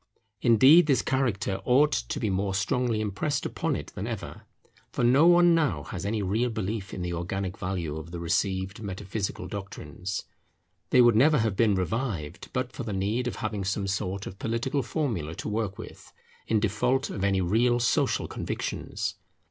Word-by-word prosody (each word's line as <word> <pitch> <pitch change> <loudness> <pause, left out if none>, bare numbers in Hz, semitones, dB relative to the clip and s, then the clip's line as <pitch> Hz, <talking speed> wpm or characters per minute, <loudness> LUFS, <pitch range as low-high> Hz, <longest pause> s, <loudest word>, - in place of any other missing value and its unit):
Indeed 130 +9 +7
this 140 -3 +3
character 115 -7 0
ought 140 +4 +4
to - - -2
be 105 - 0
more 95 +1 -1
strongly 110 +3 0
impressed 110 +8 -2
upon - - -1
it - - -6
than - - -4
ever. - - -6 0.4
For - - -2
no 135 +7 +6
one 175 0 +6
now 145 - +1
has 95 - -5
any 105 0 -1
real 110 +6 +1
belief 110 -2 -3
in 90 - -5
the 90 0 -3
organic 95 +2 -3
value 90 -5 -3
of 80 +1 -7
the 85 0 -6
received 95 +4 -1
metaphysical 100 0 -4
doctrines. 95 -2 -6 0.7
They 125 - +6
would 120 -2 +6
never 150 +7 +5
have 110 -4 +1
been 105 -1 +3
revived 95 - -3
but 125 -1 -2
for - - -6
the 110 -4 -4
need 105 +6 -1
of 125 - -3
having 105 -2 -3
some 100 +1 -1
sort 100 0 -2
of 95 - -8
political 130 +5 -1
formula 110 - -2
to - - -6
work 105 -2 -2
with, - - -11 0.4
in 110 - +2
default 125 +7 0
of 95 - -4
any 100 -1 +2
real 120 +7 +2
social 120 - +1
convictions. - - -4
105 Hz, 175 wpm, -27 LUFS, 95-125 Hz, 0.7 s, Indeed